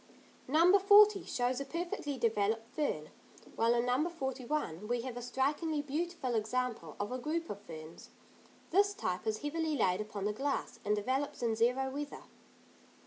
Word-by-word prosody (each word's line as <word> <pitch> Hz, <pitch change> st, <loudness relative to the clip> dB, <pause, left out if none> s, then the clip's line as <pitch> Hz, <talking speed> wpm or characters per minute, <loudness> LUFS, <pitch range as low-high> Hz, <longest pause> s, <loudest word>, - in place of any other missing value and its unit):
No. 335 Hz, +8 st, +6 dB
40 410 Hz, 0 st, +7 dB
shows 245 Hz, +1 st, 0 dB
a -, -, -3 dB
perfectly 315 Hz, -3 st, -3 dB
developed 225 Hz, -1 st, +1 dB
fern; 155 Hz, -, -2 dB, 0.4 s
while 230 Hz, +1 st, +3 dB
in 235 Hz, 0 st, +1 dB
No. 260 Hz, +7 st, +1 dB
41 265 Hz, -, -3 dB
we 240 Hz, +1 st, 0 dB
have 250 Hz, 0 st, -5 dB
a 245 Hz, -, -5 dB
strikingly 290 Hz, +5 st, 0 dB
beautiful 300 Hz, -2 st, -2 dB
example 220 Hz, -6 st, -2 dB
of 205 Hz, +2 st, -2 dB
a 255 Hz, -, -2 dB
group 330 Hz, +5 st, -2 dB
of 205 Hz, 0 st, -7 dB
ferns; 160 Hz, -1 st, -10 dB, 0.6 s
this 405 Hz, +3 st, +4 dB
type 185 Hz, -, -3 dB
is 215 Hz, +4 st, -1 dB
heavily 315 Hz, +1 st, -1 dB
laid 185 Hz, -2 st, +2 dB
upon 210 Hz, -2 st, -5 dB
the 210 Hz, -, 0 dB
glass, 275 Hz, +5 st, -2 dB
and 210 Hz, +1 st, +2 dB
develops 260 Hz, +5 st, -2 dB
in 225 Hz, -2 st, +1 dB
zero 250 Hz, +4 st, +1 dB
weather. 290 Hz, +1 st, -5 dB
255 Hz, 160 wpm, -33 LUFS, 220-305 Hz, 0.6 s, 40